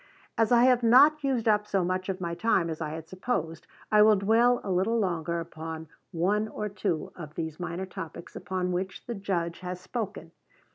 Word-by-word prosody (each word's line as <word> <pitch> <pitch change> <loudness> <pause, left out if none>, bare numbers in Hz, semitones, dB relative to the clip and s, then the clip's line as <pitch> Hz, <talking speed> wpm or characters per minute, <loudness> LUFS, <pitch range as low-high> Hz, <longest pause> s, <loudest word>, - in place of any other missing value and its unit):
As 225 0 +2
I 240 0 +6
have 250 -1 +5
not 285 +6 +6
used 255 -5 0
up 210 -1 +3
so 195 -3 +1
much 185 +1 -2
of 190 0 -2
my 170 -2 -3
time 180 -4 +1
as 160 - -6
I 155 - -2
had 160 +1 -7
supposed, 165 -5 -3 0.2
I 210 0 +6
will 215 0 +7
dwell 230 +5 +3
a 195 - -3
little 190 +6 +1
longer 170 -5 -1
upon 160 -1 -7 0.2
one 200 +5 +1
or 210 -1 -4
two 190 -5 -2
of 155 -3 -9
these 160 -1 -4
minor 175 +1 -4
topics 170 -2 -9
upon 185 -1 -2
which 185 +1 -4
the 240 - -4
Judge 180 -5 -2
has 180 0 -5
spoken. 215 +1 -5
185 Hz, 195 wpm, -28 LUFS, 170-220 Hz, 0.2 s, will